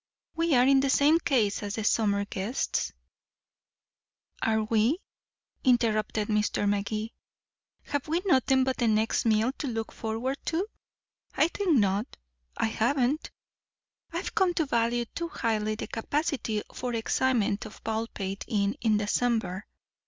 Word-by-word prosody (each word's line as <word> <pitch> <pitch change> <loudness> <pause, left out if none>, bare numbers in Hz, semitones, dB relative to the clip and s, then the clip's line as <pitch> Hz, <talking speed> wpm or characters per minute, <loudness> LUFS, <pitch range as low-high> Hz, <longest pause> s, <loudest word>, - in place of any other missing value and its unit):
We 330 -3 +2
are 245 0 +5
in 270 0 +5
the 275 0 +1
same 295 +4 +5
case 250 -12 +1
as 205 -1 -4
the 220 - -3
summer 205 -2 +2
guests 205 +5 -2 0.8
" - - -39
"Are 220 -1 +2
we?" 225 +7 +2 0.7
interrupted 220 -4 +2
Mr. 210 -1 +1
Magee. 215 +2 -1 0.7
"Have 285 0 -3
we 335 +4 0
nothing 265 -6 +4
but 260 0 -1
the 240 - +1
next 220 +1 +2
meal 220 +3 +3
to 290 - -2
look 225 -3 -3
forward 235 +5 -3
to? 345 +4 0 0.7
I 315 - +3
think 355 -6 +1
not. 205 +1 0 0.4
I - - +1
haven't. 245 +6 0 0.8
I've 340 +3 -4
come 380 -5 +2
to 320 - +1
value 235 -2 +1
too 335 +8 -5
highly 215 -4 -1
the - - -5
capacity 245 -3 -2
for 245 -1 -3
excitement 225 -2 +1
of 215 - -15
Baldpate 220 -3 -3
Inn 205 -3 0
in 220 -2 +3
December. 210 -2 0
230 Hz, 140 wpm, -28 LUFS, 215-270 Hz, 0.8 s, are